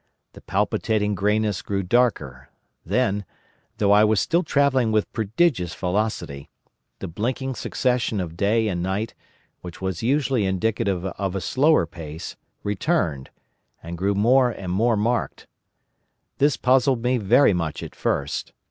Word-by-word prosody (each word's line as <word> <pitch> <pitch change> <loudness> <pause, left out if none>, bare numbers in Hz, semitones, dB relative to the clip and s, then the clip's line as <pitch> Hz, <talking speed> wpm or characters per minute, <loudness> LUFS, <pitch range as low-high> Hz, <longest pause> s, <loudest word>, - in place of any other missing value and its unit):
The - - -13
palpitating 105 -2 0
greyness 105 -1 0
grew 100 -1 -2
darker; 90 - 0 0.3
then—though 100 +1 -2
I 105 +1 +6
was 110 -1 +3
still 170 +2 +2
travelling 135 -8 +2
with 110 -1 0
prodigious 110 - 0
velocity—the 90 -7 -5
blinking 125 +9 -3
succession 125 -1 -1
of 85 -3 -4
day 110 +5 +1
and 90 -4 -2
night, 95 +5 -2 0.5
which 90 0 -9
was 95 -3 -3
usually 130 -4 +1
indicative 95 -1 -1
of 95 0 -3
a - - 0
slower 140 - +3
pace, 80 0 -8 0.3
returned, 100 - -1 0.5
and 85 +1 -6
grew 100 +4 0
more 125 +5 +4
and 95 -6 -6
more 110 +4 +2
marked. 115 +4 -1 0.9
This 145 0 +3
puzzled 130 -1 +2
me 125 +1 +2
very 115 +3 +4
much 85 -4 -3
at - - -8
first. 70 0 -2
105 Hz, 130 wpm, -23 LUFS, 90-125 Hz, 0.9 s, I